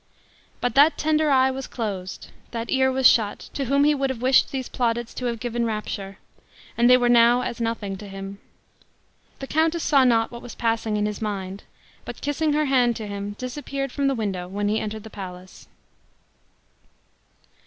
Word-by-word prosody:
But 245 -2 0
that 290 +5 +5
tender 310 0 +2
eye 265 -1 +4
was 265 0 -5
closed 195 -6 -5 0.2
that 230 0 -5
ear 265 0 +3
was 260 -1 +5
shut, 215 -3 +3 0.2
to 275 - -2
whom 280 +3 +3
he 300 +1 +4
would 275 -2 -1
have 260 -3 -4
wished 260 +1 +4
these 265 -3 -3
plaudits 235 -1 -1
to 250 - -5
have 235 -2 -2
given 240 0 -2
rapture 210 -3 -4 0.6
and 240 +1 +4
they 250 - +8
were 245 -1 +1
now 240 +1 +5
as 235 - -4
nothing 225 -4 -2
to 205 +1 -10
him. 195 0 -8 1.0
The 270 - -6
countess 320 +3 +1
saw 275 -3 +4
not 230 -3 +3
what 235 0 -8
was 245 - -10
passing 225 -2 0
in 210 - 0
his 210 0 -4
mind, 195 -2 -4 0.4
but - - -8
kissing 295 +1 0
her 305 +1 +2
hand 250 -4 +3
to 220 - -5
him, 200 0 -5
disappeared 275 +1 -4
from 280 +1 0
the 275 - +1
window 195 -6 -3
when 205 +2 -2
he 215 +1 +1
entered 215 0 -5
the 220 - -11
palace. 185 -2 -10
235 Hz, 185 wpm, -24 LUFS, 210-265 Hz, 1.0 s, they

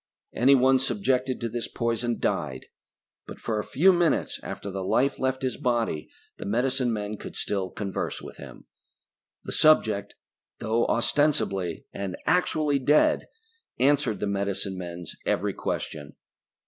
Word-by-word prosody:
Anyone 130 +1 +5
subjected 130 +1 0
to 120 - -1
this 115 +1 -3
poison 115 0 -1
died, 65 -1 -2 0.6
but - - -9
for 110 -2 -2
a - - -2
few 185 - +4
minutes 175 -2 +1
after 100 - -6
the 95 0 -4
life 135 +8 +1
left 130 0 -1
his 130 - -1
body 120 - -1 0.3
the - - -7
medicine 125 +3 +1
men 105 -1 -3
could - - -9
still 95 -2 -2
converse 100 0 -3
with - - -10
him. - - -11 0.8
The - - -6
subject, 110 -10 +3 0.4
though 115 +2 +1
ostensibly 105 - +1
and 95 -2 -4
actually 155 -5 +2
dead, 145 +4 +3 0.5
answered 140 -5 +2
the - - -1
medicine 100 -1 -2
men's 85 -1 -7
every - - +1
question. 75 -1 -4
115 Hz, 135 wpm, -26 LUFS, 100-135 Hz, 0.8 s, Anyone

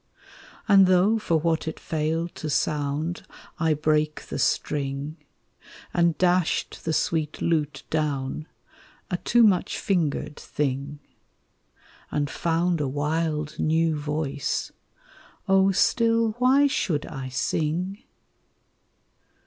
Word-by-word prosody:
And 195 -3 +7
though 185 +5 +4
for 170 -6 +1
what 160 0 0
it 160 - -4
failed 160 +2 -2
to 155 - -5
sound 150 +3 -1 0.4
I 160 -2 +2
brake 155 0 0
the - - -6
string, 140 +2 -1 0.8
And 170 -3 +2
dashed 180 -2 +1
the 160 - 0
sweet 160 -1 -1
lute 150 -4 -1
down, 150 -1 -2 0.6
a 180 - +1
too 240 +5 +3
much 195 -5 +3
fingered 150 -5 -1
thing, 145 +1 -3 1.1
And 145 -2 -1
found 170 0 0
a 145 - 0
wild 150 +2 -2
new 160 0 +2
voice, 150 -1 -2 0.8
oh, 195 0 +4
still, 230 +3 +2
why 265 +3 +5
should 170 - 0
I 135 -2 -6
sing? 165 - -2
160 Hz, 110 wpm, -25 LUFS, 150-180 Hz, 1.1 s, And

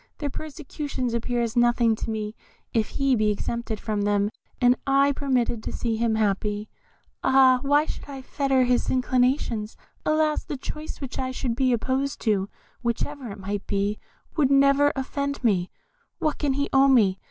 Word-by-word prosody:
Their 290 -2 -3
persecutions 290 -5 -5
appear 235 +1 -1
as 230 0 -3
nothing 240 -1 +3
to - - -4
me 215 -1 -3 0.4
if 220 -3 +1
he 275 -2 +1
be 215 -2 +2
exempted 220 +1 -3
from 215 -2 -2
them, 205 0 +1 0.3
and 245 0 +5
I 275 +1 +4
permitted 255 -5 0
to - - -5
see 230 -2 -1
him 225 0 +1
happy. 210 0 -1 0.5
Ah! 260 -1 +5
why 290 +2 +3
should - - -6
I 270 -2 -7
fetter 270 -1 +1
his 245 0 +1
inclinations? 250 -3 0 0.3
Alas! 310 0 +1
the 285 - -5
choice 305 +4 -7
which 270 -2 -5
I 260 -1 -1
should 255 -2 -2
be 260 0 +2
opposed 260 +4 -1
to, 205 -3 +1 0.3
whatever 250 +2 -3
it 200 - -7
might 200 +1 -4
be, 200 +1 -1 0.4
would 290 -5 +3
never 275 +1 +5
offend 280 +1 -3
me; 185 -6 +2 0.5
what 305 -1 -1
can 285 -2 +1
he 280 +1 0
owe 270 0 +6
me? 210 -8 +4
250 Hz, 170 wpm, -25 LUFS, 220-275 Hz, 0.5 s, owe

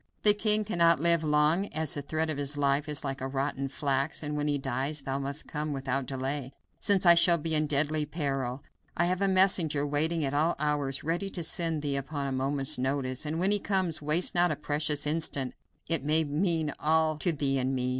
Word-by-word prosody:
The 210 - +8
king 210 0 +3
cannot 170 -6 +3
live 170 0 +3
long, 155 +5 +2
as 155 -4 -1
the 145 - -4
thread 155 +2 -2
of 145 - -4
his 145 +1 -2
life 140 +1 +1
is 150 -1 -3
like 135 -2 -4
rotten 135 +1 -2
flax, 140 +2 -2
and 150 0 -3
when 150 0 -1
he 145 -1 +1
dies 140 +3 -3
thou 135 0 -3
must 140 +2 -6
come 150 -1 -4
without 135 -1 -2
delay, 135 0 -4 0.3
since 200 -2 +2
I 170 - +9
shall 170 0 +5
be 160 0 -3
in 155 0 +2
deadly 150 +1 0
peril. 135 -4 -3 0.3
I 170 - +3
have 180 +2 -1
a 195 - +3
messenger 185 -6 +3
waiting 155 +2 0
at 135 - -2
all 155 +4 +1
hours 145 -2 -1
ready 175 +5 -1
to 175 -3 -3
send 160 -1 -2
to - - -3
thee 140 -1 0
upon 140 +1 -4
a 135 - -2
moment's 135 0 0
notice, 130 +1 -1
and 155 +2 -2
when 185 +4 +1
he 205 - +4
comes 190 -6 0
waste 155 +4 +2
not 175 0 +3
a 155 - -1
precious 150 0 -1
instant; 150 -4 -2 0.3
it 165 -3 -1
may 155 +2 +3
mean 155 0 -1
all 160 0 +2
to 175 - +2
thee 140 -3 0
and 130 +1 -1
me. 125 0 -1
150 Hz, 215 wpm, -28 LUFS, 140-165 Hz, 0.3 s, I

